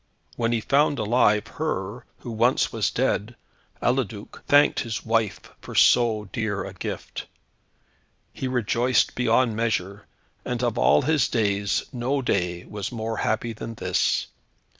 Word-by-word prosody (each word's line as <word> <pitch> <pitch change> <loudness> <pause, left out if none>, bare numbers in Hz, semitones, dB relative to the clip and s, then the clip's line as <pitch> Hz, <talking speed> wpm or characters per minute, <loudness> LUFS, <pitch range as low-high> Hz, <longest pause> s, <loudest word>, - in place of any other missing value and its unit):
When 115 -1 0
he 115 -1 0
found 140 +4 +2
alive, 105 -2 +2
her, 120 -6 -4 0.2
who 120 - -6
once 115 +3 +2
was - - +1
dead, 110 +4 -1 0.5
Eliduc 120 -5 -2
thanked 145 +1 +5
his 115 -3 -4
wife 115 -2 0 0.2
for - - -9
so 110 -4 +4
dear 110 -4 -2
a - - -8
gift. - - -6 1.1
He 130 - -4
rejoiced 125 0 +1
beyond 120 -1 +2
measure, 105 -3 -2 0.4
and 125 0 -3
of 120 -1 0
all - - +4
his 155 +1 +2
days, 100 -3 0
no 130 +3 -1
day 90 -6 -1
was 105 -2 -5
more 115 -2 -3
happy 115 +1 -1
than 115 +1 -7
this. 95 -4 0
115 Hz, 140 wpm, -24 LUFS, 105-125 Hz, 1.1 s, thanked